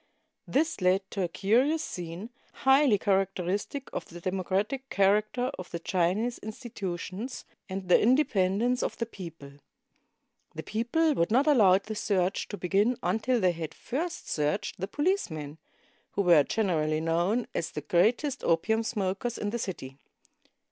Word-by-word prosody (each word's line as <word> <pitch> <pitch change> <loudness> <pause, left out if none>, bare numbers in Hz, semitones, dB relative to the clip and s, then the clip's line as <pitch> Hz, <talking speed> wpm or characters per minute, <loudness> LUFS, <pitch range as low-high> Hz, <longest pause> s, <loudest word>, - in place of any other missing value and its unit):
This 305 -5 0
led 185 +2 +3
to 195 - -2
a 180 - +1
curious 250 - +2
scene, 175 +6 -6 0.3
highly 265 -4 +6
characteristic 195 +6 -1
of - - -4
the 175 - -11
democratic 195 +9 -2
character 215 +6 +2
of 180 - -7
the 170 - -4
Chinese 185 +8 0
institutions 215 0 -6 0.2
and 190 0 -5
the 180 - +5
independence 240 -2 +2
of - - -2
the 230 - -1
people. 165 -10 -10 1.0
The 160 - -5
people 240 +9 +1
would 170 -10 +1
not 255 +6 +3
allow 215 -11 +6
the 215 +2 -6
search 190 -3 0
to 205 - -6
begin 200 +7 +1
until 230 +3 +1
they 185 -3 +3
had 165 -2 -6
first 335 +8 -4
searched 150 +3 -1
the 190 - -2
policemen, 185 - -2 0.5
who 200 - +1
were 170 -4 +7
generally 155 -4 0
known 175 +8 +1
as 160 - -2
the 150 - -5
greatest 230 - +1
opium 220 +7 +2
smokers 210 +1 -2
in 205 - -2
the 235 - -2
city. 135 -10 -6
200 Hz, 145 wpm, -28 LUFS, 175-240 Hz, 1.0 s, were